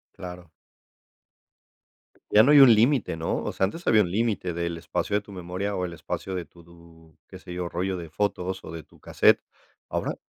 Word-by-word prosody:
Claro. 90 Hz, -2 st, -9 dB, 1.8 s
Ya 105 Hz, -, +7 dB
no 140 Hz, -, +4 dB
hay 150 Hz, -, +8 dB
un 135 Hz, -4 st, +9 dB
límite, 115 Hz, -, +2 dB
¿no? 80 Hz, -, -2 dB
O -, -, -3 dB
sea, 95 Hz, -, +1 dB
antes 165 Hz, -, -6 dB
había 110 Hz, -2 st, +5 dB
un 90 Hz, -4 st, -1 dB
límite 105 Hz, -4 st, -1 dB
del 85 Hz, 0 st, -3 dB
espacio 100 Hz, +4 st, -2 dB
de 105 Hz, -, +1 dB
tu 100 Hz, -, -15 dB
memoria 95 Hz, +2 st, -4 dB
o 90 Hz, -, -1 dB
el 85 Hz, -, -6 dB
espacio 95 Hz, +3 st, -5 dB
de 90 Hz, -2 st, -4 dB
tu, 85 Hz, -2 st, -19 dB
qué -, -, -11 dB
se 90 Hz, -, -10 dB
yo, 90 Hz, -1 st, -4 dB
rollo 95 Hz, +2 st, -2 dB
de 85 Hz, -2 st, -8 dB
fotos 95 Hz, +1 st, -2 dB
o -, -, -9 dB
de 80 Hz, -1 st, -7 dB
tu -, -, -23 dB
cassette, -, -, +3 dB, 0.5 s
ahora, -, -, -2 dB
90 Hz, 200 wpm, -26 LUFS, 85-105 Hz, 1.8 s, un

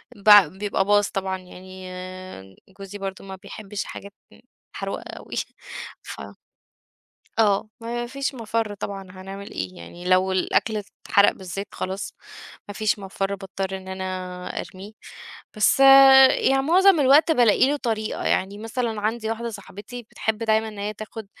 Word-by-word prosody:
بع 205 Hz, -2 st, +8 dB
بيبقى 195 Hz, +3 st, -2 dB
باظ 205 Hz, 0 st, +3 dB
طبعًا، 190 Hz, -1 st, -3 dB
يعني 185 Hz, +1 st, -12 dB, 0.9 s
جوزي 195 Hz, +1 st, -8 dB
برضه 195 Hz, -1 st, -6 dB
ما 190 Hz, 0 st, -7 dB
بيحبش 205 Hz, +1 st, -7 dB
حاجات 200 Hz, 0 st, -9 dB, 0.2 s
م -, -, -18 dB, 0.4 s
محروقة -, -, -4 dB, 0.2 s
أوي. -, -, -9 dB, 0.7 s
ف -, -, -8 dB, 1.2 s
آه. 210 Hz, -1 st, +3 dB
ما 240 Hz, +1 st, -4 dB
فيش 275 Hz, +2 st, -3 dB
مَفَر 225 Hz, -2 st, -2 dB
طبعًا 200 Hz, -1 st, -5 dB
هنعمل 195 Hz, +2 st, -9 dB
إيه؟ 95 Hz, -1 st, -5 dB
يعني 170 Hz, -, -11 dB
لو 185 Hz, +1 st, +3 dB
الأكل 215 Hz, +3 st, +1 dB, 0.3 s
اتحرق 200 Hz, 0 st, +5 dB
بالذات 190 Hz, +2 st, -6 dB
خلاص 190 Hz, +1 st, -4 dB, 0.6 s
ما 205 Hz, -, -7 dB
فيش 215 Hz, 0 st, 0 dB
مَفَر 195 Hz, 0 st, -3 dB
باضطر 195 Hz, 0 st, -5 dB
إن 190 Hz, 0 st, -11 dB
أنا 190 Hz, 0 st, -5 dB, 0.6 s
أرميه. 195 Hz, +3 st, -10 dB, 0.6 s
بس 215 Hz, +5 st, +3 dB, 0.5 s
يعني 270 Hz, 0 st, +2 dB
معظم 365 Hz, +3 st, +5 dB
الوقت 285 Hz, +4 st, +5 dB
بالاقي 245 Hz, -1 st, +4 dB
له 295 Hz, -, +1 dB
طريقة، 220 Hz, -5 st, -3 dB
يعني 195 Hz, +2 st, 0 dB
مثلًا 225 Hz, 0 st, -3 dB
عندي 220 Hz, +1 st, -2 dB
واحدة 230 Hz, +1 st, -3 dB
صاحبتي 210 Hz, +3 st, -9 dB
بتحب 220 Hz, -1 st, -2 dB
دايمًا 220 Hz, -1 st, +1 dB
إن 210 Hz, -, -10 dB
هي 205 Hz, +1 st, -3 dB
تاخد 215 Hz, 0 st, -8 dB
205 Hz, 145 wpm, -24 LUFS, 190-225 Hz, 1.2 s, بع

